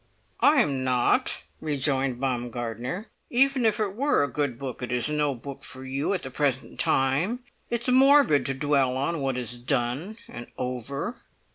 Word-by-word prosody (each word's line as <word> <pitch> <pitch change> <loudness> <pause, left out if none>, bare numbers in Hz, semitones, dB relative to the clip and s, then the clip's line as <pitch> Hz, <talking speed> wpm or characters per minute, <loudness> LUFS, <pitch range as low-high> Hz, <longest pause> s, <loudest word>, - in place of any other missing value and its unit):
"I 285 -3 +5
am 135 -6 -2
not," 125 -1 +2 0.2
rejoined 135 -4 0
Baumgartner. 125 - -3 0.2
"Even 265 -1 +4
if 220 - +1
it 205 -3 -1
were 280 - +2
a - - +1
good 140 -3 -2
book, 130 -2 -6
it 125 - -4
is 125 +4 +1
no 150 -2 0
book 140 +3 -9
for 130 0 -5
you 135 +8 -1
at 185 - -4
the 130 - -6
present 135 -1 -1
time. 160 - +1 0.3
It 235 0 -2
is 255 - -1
morbid 265 - +5
to 135 - 0
dwell 135 -2 +1
on 150 +4 -1
what 135 -2 -1
is 120 -1 -2
done 135 - -2
and 120 0 -9
over." 130 - -4
140 Hz, 170 wpm, -26 LUFS, 125-185 Hz, 0.3 s, I